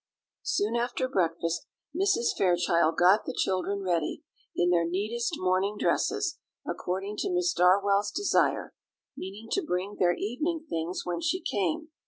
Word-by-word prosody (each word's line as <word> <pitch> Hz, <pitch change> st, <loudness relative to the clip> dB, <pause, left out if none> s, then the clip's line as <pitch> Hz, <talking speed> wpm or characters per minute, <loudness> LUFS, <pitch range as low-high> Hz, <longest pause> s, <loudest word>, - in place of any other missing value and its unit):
Soon 210 Hz, +3 st, 0 dB
after 240 Hz, +2 st, 0 dB
breakfast 165 Hz, -6 st, -1 dB, 0.3 s
Mrs. 380 Hz, -10 st, +2 dB
Fairchild 175 Hz, -3 st, +2 dB
got 185 Hz, +4 st, +5 dB
the -, -, -3 dB
children 195 Hz, +1 st, 0 dB
ready, 170 Hz, -4 st, -1 dB, 0.3 s
in 175 Hz, 0 st, +2 dB
their 170 Hz, -1 st, +3 dB
neatest 215 Hz, +7 st, -1 dB
morning 185 Hz, +3 st, +1 dB
dresses, -, -, 0 dB, 0.3 s
according 195 Hz, +3 st, -3 dB
to 390 Hz, -, -1 dB
Miss 360 Hz, -1 st, +1 dB
Darwell's 200 Hz, -, +3 dB
desire; 400 Hz, 0 st, +1 dB, 0.4 s
meaning 200 Hz, +4 st, -8 dB
to 395 Hz, -, +2 dB
bring 195 Hz, -, -3 dB
their 175 Hz, -1 st, +3 dB
evening 310 Hz, +9 st, -2 dB
things 165 Hz, -, -3 dB
when 175 Hz, -1 st, -2 dB
she 350 Hz, +3 st, 0 dB
came. 205 Hz, -, -1 dB
195 Hz, 140 wpm, -28 LUFS, 180-235 Hz, 0.4 s, got